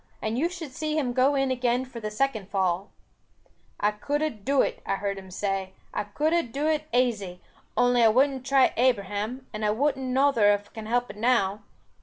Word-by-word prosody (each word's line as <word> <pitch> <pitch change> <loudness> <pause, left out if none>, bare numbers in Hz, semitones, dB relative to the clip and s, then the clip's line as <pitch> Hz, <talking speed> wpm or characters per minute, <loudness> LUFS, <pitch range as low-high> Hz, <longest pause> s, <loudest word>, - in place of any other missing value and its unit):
And 220 +1 -2
you 310 +8 +1
should 340 -6 -7
see 310 +3 -2
him 255 -5 0
go 265 +3 +3
in 270 -1 +1
again 250 0 0
for 250 -2 -9
the 215 -1 -4
second 220 -3 -1
fall. 190 -1 0 0.9
'I 210 - +3
could 285 +8 -2
ha 310 - +2
dooed 260 +3 +1
it,' - - -14
I - - -1
hear 200 0 -2
him 190 -1 -10
say, 195 0 -3 0.2
'I 210 - -2
could 300 +10 0
ha 340 - +4
dooed 290 +4 -1
it 305 0 -3
aisy, 210 -8 0 0.4
only 245 0 +4
I - - +7
wudn't 265 +3 +2
try 270 0 +4
Abraham, 230 +1 0
and 215 0 -4
I 210 - +2
wun't 265 +6 +1
nother 260 -4 +3
if 205 0 -10
can 220 -1 -7
help 245 +2 0
it - - -15
now. 215 -3 +1
245 Hz, 205 wpm, -26 LUFS, 205-270 Hz, 0.9 s, I